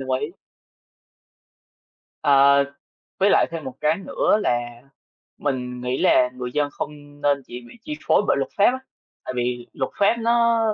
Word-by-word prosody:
đồng 135 Hz, 0 st, -6 dB
ý. -, -, -1 dB, 2.0 s
Ờ, 140 Hz, 0 st, +5 dB, 0.5 s
với 195 Hz, +1 st, +4 dB
lại -, -, +4 dB
thêm 165 Hz, -2 st, -6 dB
một 130 Hz, -1 st, -7 dB
cái 155 Hz, +4 st, +2 dB
nữa 195 Hz, -, +1 dB
là 120 Hz, 0 st, -2 dB, 0.6 s
mình 125 Hz, -3 st, -3 dB
nghĩ 125 Hz, +1 st, -2 dB
là 125 Hz, -, +4 dB
người 125 Hz, 0 st, -6 dB
dân 145 Hz, +1 st, 0 dB
không 145 Hz, 0 st, -8 dB
nên 140 Hz, -1 st, +1 dB
chỉ 120 Hz, +1 st, -8 dB
bị -, -, -14 dB
chi 300 Hz, +4 st, -5 dB
phối -, -, +4 dB
bởi -, -, +3 dB
luật 135 Hz, -, -2 dB
pháp 200 Hz, -, +4 dB
á, 260 Hz, -, -3 dB, 0.5 s
tại -, -, -4 dB
vì 120 Hz, 0 st, -2 dB
luật 130 Hz, -, -3 dB
pháp 200 Hz, +3 st, +4 dB
nó 235 Hz, 0 st, +3 dB
140 Hz, 170 wpm, -23 LUFS, 125-165 Hz, 2.0 s, Ờ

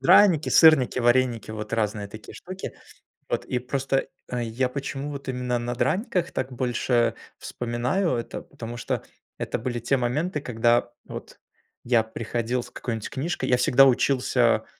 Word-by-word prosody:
Драники, 160 Hz, +3 st, +6 dB
сырники, 155 Hz, -6 st, +6 dB
вареники, 120 Hz, -2 st, +2 dB
вот 110 Hz, 0 st, -6 dB
разные 105 Hz, -2 st, -1 dB
такие 105 Hz, +1 st, -11 dB
штуки. 185 Hz, +1 st, -7 dB, 0.6 s
Вот. -, -, -1 dB
И 125 Hz, -, -1 dB
просто, 135 Hz, +1 st, -1 dB, 0.2 s
э, 125 Hz, -1 st, -2 dB
я 120 Hz, +3 st, 0 dB
почему 140 Hz, +2 st, -4 dB
вот 140 Hz, -1 st, -6 dB
именно 125 Hz, -1 st, -1 dB
на 120 Hz, +1 st, -3 dB
драниках 180 Hz, -, 0 dB
так 130 Hz, 0 st, -3 dB
больше 120 Hz, -1 st, +1 dB, 0.2 s
вспоминаю 125 Hz, +10 st, -1 dB
это? 115 Hz, -1 st, -4 dB
Потому 115 Hz, 0 st, -8 dB
что -, -, -2 dB, 0.3 s
это -, -, -3 dB
были 120 Hz, +1 st, -3 dB
те 120 Hz, +4 st, +1 dB
моменты, 150 Hz, +6 st, -1 dB
когда 120 Hz, -1 st, +2 dB
вот -, -, -9 dB, 0.4 s
я 120 Hz, -2 st, +4 dB
приходил 115 Hz, +2 st, -2 dB
с 125 Hz, -, -13 dB
какой-нибудь 115 Hz, -3 st, -4 dB
книжкой, 135 Hz, -1 st, -2 dB
я 125 Hz, -, +4 dB
всегда 135 Hz, +2 st, +6 dB
учился, 130 Hz, 0 st, +3 dB
125 Hz, 150 wpm, -25 LUFS, 120-135 Hz, 0.6 s, Драники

